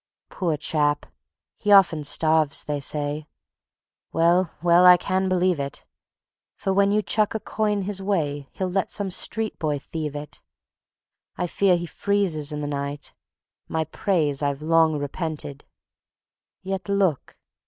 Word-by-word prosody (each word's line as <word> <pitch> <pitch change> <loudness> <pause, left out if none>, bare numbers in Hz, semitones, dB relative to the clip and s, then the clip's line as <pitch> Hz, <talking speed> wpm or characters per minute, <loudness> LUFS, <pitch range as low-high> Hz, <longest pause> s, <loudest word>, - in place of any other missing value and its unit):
Poor 165 -5 -1
chap! 145 0 0 0.5
he 210 - -1
often 180 -6 +6
starves, 155 0 +2
they 145 -1 -3
say; 145 +2 -3 0.8
Well, 170 +2 +3
well, 175 +1 +5
I 180 0 +9
can 190 +1 -1
believe 180 -3 +2
it; 140 0 -5 0.7
For 195 - -1
when 200 +1 +3
you 210 +1 +2
chuck 215 +1 0
a - - 0
coin 210 -2 -1
his 195 0 -3
way 145 -8 -1
He'll 185 -1 -3
let 190 0 0
some 200 -2 -2
street 220 +4 -3
boy 150 -3 0
thieve 150 0 -5
it. 145 0 -7 1.0
I 180 - -1
fear 180 +1 +2
he 175 - -4
freezes 175 -6 -1
in 150 0 -4
the 145 - -3
night; 145 0 -4 0.5
My 160 0 -1
praise 155 -3 -1
I've 140 0 -1
long 160 -1 +3
repented, 145 -1 -5 1.0
Yet 190 -1 -4
look! 195 -8 0
165 Hz, 145 wpm, -24 LUFS, 150-190 Hz, 1.0 s, I